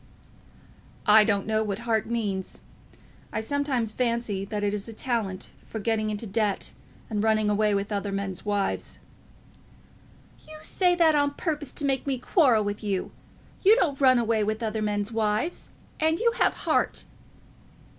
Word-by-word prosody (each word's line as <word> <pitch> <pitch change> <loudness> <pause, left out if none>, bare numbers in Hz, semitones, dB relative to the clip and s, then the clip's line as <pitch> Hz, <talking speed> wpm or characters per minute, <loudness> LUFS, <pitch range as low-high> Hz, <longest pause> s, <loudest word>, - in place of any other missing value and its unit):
"I 215 +1 +7
don't 200 -2 +1
know 220 0 +1
what 200 -2 -2
heart 220 -3 +1
means. 205 -5 -3 0.7
I - - -2
sometimes 260 -2 -1
fancy 235 -4 -1
that 205 0 -4
it 205 0 +1
is 205 0 -3
a 225 - -7
talent 215 -5 -3
for - - -7
getting 215 0 0
into 210 +1 -3
debt, 205 -1 -1 0.4
and 210 -3 -2
running 215 -1 +2
away 210 0 +2
with 200 +1 -2
other 200 0 -2
men's 195 -2 -4
wives." 205 -1 -2 1.5
"You 310 - -10
say 360 -2 +2
that 330 -2 +4
on 285 -1 +1
purpose 300 -5 -3
to 290 - -3
make 270 0 0
me 270 -2 0
quarrel 250 - +3
with 205 +1 -4
you. 195 -3 -2 0.5
You 415 +3 +7
don't 295 - 0
run 255 -2 +6
away 225 -2 +1
with 215 +2 -2
other 220 -1 -2
men's 205 0 -1
wives, 220 +8 -1 0.3
and 320 +1 +2
you 470 0 +3
have - - +3
heart." - - +1
220 Hz, 160 wpm, -26 LUFS, 205-260 Hz, 1.5 s, I